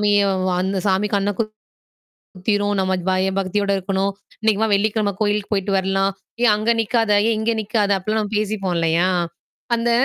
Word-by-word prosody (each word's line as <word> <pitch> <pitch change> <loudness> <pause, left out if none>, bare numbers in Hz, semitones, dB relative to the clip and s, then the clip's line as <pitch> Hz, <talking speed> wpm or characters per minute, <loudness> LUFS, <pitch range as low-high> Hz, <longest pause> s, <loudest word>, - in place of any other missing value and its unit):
சாமியும் 200 -1 +3 0.2
வ - - +2
அந்த 190 0 -1
சாமி 195 +2 +2
கண்ணு 200 0 +1 0.8
குத்திரும், 205 +2 -2
நம்ம 190 0 0 0.2
பய 185 +1 +1
பக்தியோட 200 +1 0
இருக்கணும், 195 +1 -1 0.3
இன்னைக்கு 220 -1 +2
வா 220 - +2
வெள்ளிக்கிழம 210 0 +1
கோயிலுக்குப் 210 0 0
போயிட்டு 195 0 -1
வரலாம், 195 +1 +1 0.3
ஏய் 235 - +6
அங்க 215 +2 0
நிக்காத! 225 0 +1 0.2
ஏய் 230 - +2
இங்க 225 +1 0
நிக்காத!" 210 -1 0
அப்படின்லாம் 215 +2 -2
பேசிப்போம் 200 -4 -1
இல்லையா? 165 +2 +2 0.7
அந்த 235 +1 0
205 Hz, 155 wpm, -21 LUFS, 190-215 Hz, 0.8 s, ஏய்